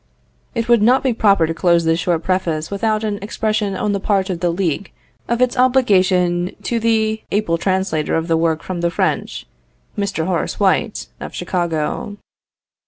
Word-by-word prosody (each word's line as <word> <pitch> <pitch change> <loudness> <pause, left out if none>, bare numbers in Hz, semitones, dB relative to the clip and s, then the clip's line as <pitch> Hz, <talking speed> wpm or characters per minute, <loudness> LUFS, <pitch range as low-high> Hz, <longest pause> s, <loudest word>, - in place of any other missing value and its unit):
It 230 -1 -1
would 235 -2 +4
not 250 +4 +4
be 260 -3 +2
proper 200 -6 +3
to 165 - -2
close 170 0 +2
this 165 +1 +2
short 175 -2 0
preface 170 -4 -1
without 215 +2 0
an 210 -2 -2
expression 215 -1 -1
on 205 +2 -1
the 200 - -1
part 195 -1 0
of 175 - -4
the 175 0 +1
League 175 +1 -2 0.4
of 235 +1 +2
its 250 - 0
obligation 185 -8 +2
to 235 - -1
the 220 -1 +1
able 185 -5 0
translator 185 -4 0
of 165 0 -1
the 165 - +2
work 160 -1 0
from 180 -2 -4
the 170 - +1
French, 170 - -2 0.5
Mr. 195 -5 -2
Horace 180 -3 -2
White, 205 +2 +1
of - - -7
Chicago. 175 +2 -2
190 Hz, 170 wpm, -19 LUFS, 170-215 Hz, 0.5 s, would